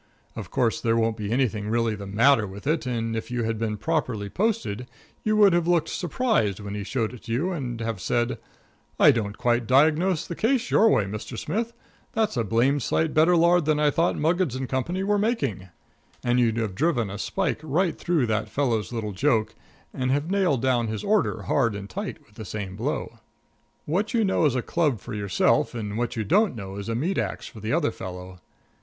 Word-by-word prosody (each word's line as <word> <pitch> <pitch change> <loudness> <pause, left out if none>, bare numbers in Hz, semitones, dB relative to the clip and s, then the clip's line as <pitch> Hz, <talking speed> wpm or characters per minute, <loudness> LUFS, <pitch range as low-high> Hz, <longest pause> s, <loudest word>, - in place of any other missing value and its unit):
Of - - -7
course, 120 -4 0
there 115 0 +2
won't 115 -1 +1
be 105 -1 -4
anything 115 -4 0
really 115 0 +1
the 100 -1 -7
matter 110 +2 +4
with 95 +2 -10
it, 150 -2 0
and 115 -2 -2
if 110 - -4
you 120 -1 -1
had 110 -1 -2
been 110 -2 -2
properly 115 -6 -1
posted 190 - -1 0.4
you 215 0 +1
would 205 -3 +6
have 170 -1 +2
looked 170 -3 +2
surprised 175 - 0
when 100 -1 -6
he 105 -1 -4
showed 115 +1 -2
it 120 - -12
to 115 - -6
you 150 +11 0
and 125 -9 -4
have 115 -4 -3
said: 120 +4 0 0.6
"I - - +8
don't 105 -3 -2
quite 120 -1 +1
diagnose 155 +6 +3
the - - -5
case 240 +3 0
your 225 - +5
way, 110 - +3
Mr. 105 +4 -6
Smith; 230 - -2 0.4
that's 220 -5 0
a 120 - +1
blamed 120 +7 +2
sight 160 +6 0
better 165 +3 +5
lard 170 0 +4
than 155 -1 +2
I 150 -1 +3
thought 165 +4 +1
Muggins 160 -4 +1
& 130 - -3
Co. 170 +10 -2
were 205 0 +2
making." 140 - -1 0.6
And 120 0 +2
you'd 115 -2 +2
have 110 -4 -1
driven 120 - 0
a 100 - -6
spike - - -1
right 165 +4 0
through 170 -7 +1
that 110 -1 -1
fellow's 115 -9 0
little 110 -3 -3
joke 110 +1 +1 0.4
and 130 0 -2
have 145 +6 0
nailed 180 -11 +1
down 125 -3 +2
his 110 -1 -4
order 210 0 +1
hard 115 -7 +1
and 100 0 -6
tight 95 - -6
with 105 - -25
the 110 - -6
same 95 -2 -5
blow. 120 0 -3 0.7
What 200 - -1
you 225 -2 +3
know 190 -4 +2
is 140 -4 +2
a 125 - -1
club 150 -9 0
for - - -8
yourself, 100 +2 +1
and 105 -3 -4
what 120 +2 -2
you 110 - -1
don't 200 - +2
know 100 -2 -7
is 100 +2 -5
a 115 - -1
meat 170 +11 0
ax - - -3
for 110 - -10
the 110 +2 -3
other 155 -2 +2
fellow. 90 0 -8
125 Hz, 210 wpm, -25 LUFS, 110-165 Hz, 0.7 s, I